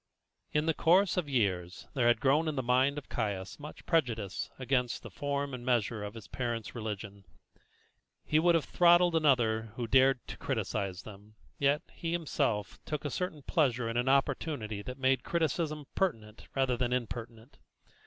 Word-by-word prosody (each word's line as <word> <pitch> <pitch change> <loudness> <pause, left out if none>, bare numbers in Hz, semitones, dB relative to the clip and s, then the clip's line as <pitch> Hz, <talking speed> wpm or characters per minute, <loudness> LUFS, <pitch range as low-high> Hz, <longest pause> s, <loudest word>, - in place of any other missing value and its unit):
In 150 0 +1
the 160 - +2
course 180 +6 +4
of 175 -5 -1
years 95 -8 -1
there 125 -3 +2
had 120 -2 +4
grown 145 +5 +3
in 155 - -1
the 130 - -1
mind 130 +4 +2
of 145 - -6
Caius 100 -3 -3
much 150 +1 -10
prejudice 115 - 0
against 125 -2 0
the - - -9
form 140 -1 -2
and 125 -1 -6
measure 115 -3 0
of 105 +2 -6
his 115 - -10
parents' 120 -3 -3
religion. 105 -3 -6 1.0
He 155 - +3
would 170 +1 +4
have 160 -4 +1
throttled 175 +2 +5
another 115 -8 +2
who 120 - -3
dared 130 +1 +4
to - - -6
criticise 95 -1 -2
them, 105 0 -13 0.2
yet 140 +1 +2
he 165 0 -3
himself 120 - -1
took 150 -1 -4
a 145 - -2
certain 165 -4 -3
pleasure 125 -9 +1
in 115 - -3
an 120 +2 +1
opportunity 135 -5 0
that 125 +5 -7
made 130 -1 +2
criticism 155 -2 -1
pertinent 115 - -2
rather 130 -2 +2
than 125 0 -1
impertinent. 120 +1 -5
130 Hz, 170 wpm, -31 LUFS, 110-150 Hz, 1.0 s, throttled